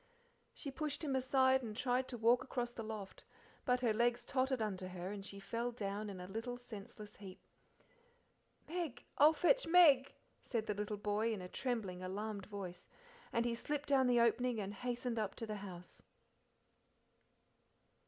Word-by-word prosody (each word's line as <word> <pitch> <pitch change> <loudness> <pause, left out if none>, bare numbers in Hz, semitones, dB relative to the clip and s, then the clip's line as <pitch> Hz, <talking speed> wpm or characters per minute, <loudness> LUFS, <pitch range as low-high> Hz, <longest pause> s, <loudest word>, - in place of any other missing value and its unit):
She 280 - -5
pushed 295 +1 -3
him 280 -3 0
aside 260 0 +4
and 220 -3 -6
tried 255 0 +1
to 245 - -5
walk 235 +2 +4
across 245 -2 -2
the 235 - -6
loft, 215 -3 -6 0.4
but 250 0 +2
her 235 -3 +3
legs 240 +2 +2
tottered 260 -1 +1
under 190 -4 -2
her 185 +1 -5
and 205 -1 -6
she 200 0 -6
fell 235 +4 -2
down 210 -2 -3
in 190 -2 -7
a 180 - -6
little 225 +5 -4
senseless 215 -3 -9
heap. 190 -2 -10 1.3
"Meg 335 -5 -3 0.2
I'll 295 +2 +9
fetch 360 +10 +3
Meg," 300 -6 +6 0.3
said 230 -4 -1
the 210 - 0
little 210 +1 -3
boy 210 +2 0
in 215 - -2
a - - -5
trembling, 210 -6 -2
alarmed 200 +1 -4
voice, 195 -4 -6 0.4
and 235 0 +1
he 240 - +1
slipped 290 +5 -3
down 265 -2 +5
the 245 -1 +4
opening 235 0 +3
and 200 0 -3
hastened 245 +1 -2
up 210 -3 -2
to 225 - -4
the 215 -1 -4
house. 180 -3 -9
230 Hz, 170 wpm, -37 LUFS, 205-255 Hz, 1.3 s, I'll